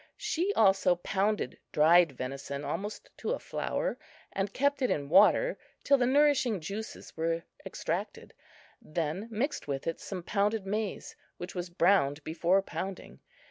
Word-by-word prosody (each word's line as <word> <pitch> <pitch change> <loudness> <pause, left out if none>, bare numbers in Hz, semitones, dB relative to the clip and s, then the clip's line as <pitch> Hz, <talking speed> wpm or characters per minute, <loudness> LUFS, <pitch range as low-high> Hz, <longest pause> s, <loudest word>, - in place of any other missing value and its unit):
She 360 +5 0
also 195 -3 +4
pounded 200 +4 -1
dried 165 0 +5
venison 135 +2 -5
almost 205 +2 -5
to 475 - -2
a - - -3
flour, - - -3 0.3
and 195 +1 -1
kept 280 +4 +1
it 255 - +2
in 140 -1 -1
water 210 - +5 0.2
till 280 -1 +4
the 245 - +3
nourishing 265 -6 +3
juices 200 +7 -7
were 165 +1 -1 0.2
extracted, - - -4 0.5
then 165 +6 -3
mixed 235 - -2
with 140 -1 -3
it 165 - -2
some 185 -3 -6
pounded 205 +2 0
maize, 210 0 -3 0.2
which 175 +1 -7
was 175 -1 -4
browned 170 -5 +2
before 170 +5 +2
pounding. 195 -1 -6
195 Hz, 140 wpm, -30 LUFS, 165-220 Hz, 0.5 s, dried